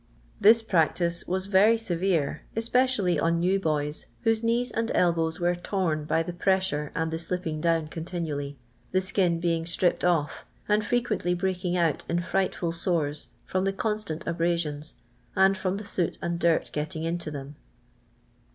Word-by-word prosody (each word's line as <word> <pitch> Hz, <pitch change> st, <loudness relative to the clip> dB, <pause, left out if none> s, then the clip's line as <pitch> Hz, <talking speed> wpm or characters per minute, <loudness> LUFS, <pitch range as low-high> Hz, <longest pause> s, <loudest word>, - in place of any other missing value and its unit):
This 225 Hz, +2 st, +6 dB
practice 170 Hz, -3 st, +1 dB
was 185 Hz, +1 st, -1 dB
very 205 Hz, +3 st, +5 dB
severe, 175 Hz, -8 st, 0 dB
especially 225 Hz, -, +2 dB
on 170 Hz, +2 st, +2 dB
new 185 Hz, +3 st, +2 dB
boys, 150 Hz, -3 st, -2 dB
whose 225 Hz, -2 st, +2 dB
knees 235 Hz, +2 st, +1 dB
and 230 Hz, 0 st, -1 dB
elbows 165 Hz, -2 st, +2 dB
were 175 Hz, 0 st, +2 dB
torn 175 Hz, -4 st, -1 dB
by 160 Hz, +2 st, +1 dB
the 175 Hz, -, -5 dB
pressure 180 Hz, -5 st, 0 dB
and 160 Hz, 0 st, -1 dB
the 160 Hz, -, -2 dB
slipping 170 Hz, -2 st, -3 dB
down 165 Hz, -1 st, +2 dB
continually 155 Hz, -4 st, -4 dB, 0.2 s
— -, -, -35 dB
the 185 Hz, -, +4 dB
skin 185 Hz, -3 st, +1 dB
being 165 Hz, -1 st, 0 dB
stripped 175 Hz, +1 st, +1 dB
off, 165 Hz, -5 st, +1 dB, 0.2 s
and 210 Hz, 0 st, +2 dB
frequently 215 Hz, -6 st, 0 dB
breaking 180 Hz, -1 st, -1 dB
out 165 Hz, -4 st, +1 dB
in 170 Hz, -, +1 dB
fright 190 Hz, +2 st, 0 dB
ful 170 Hz, -2 st, -2 dB
sores, 165 Hz, -4 st, -1 dB, 0.2 s
from 185 Hz, 0 st, -1 dB
the 195 Hz, 0 st, 0 dB
constant 210 Hz, -6 st, -3 dB
abrasions, 165 Hz, -3 st, -1 dB, 0.4 s
and 190 Hz, 0 st, +5 dB
from 190 Hz, 0 st, -2 dB
the 210 Hz, -, -7 dB
soot 180 Hz, -4 st, -1 dB
and 170 Hz, 0 st, -2 dB
dirt 170 Hz, -1 st, +2 dB
getting 155 Hz, +1 st, -3 dB
into 165 Hz, -1 st, -2 dB
them. 145 Hz, 0 st, -7 dB
175 Hz, 160 wpm, -27 LUFS, 160-190 Hz, 0.4 s, This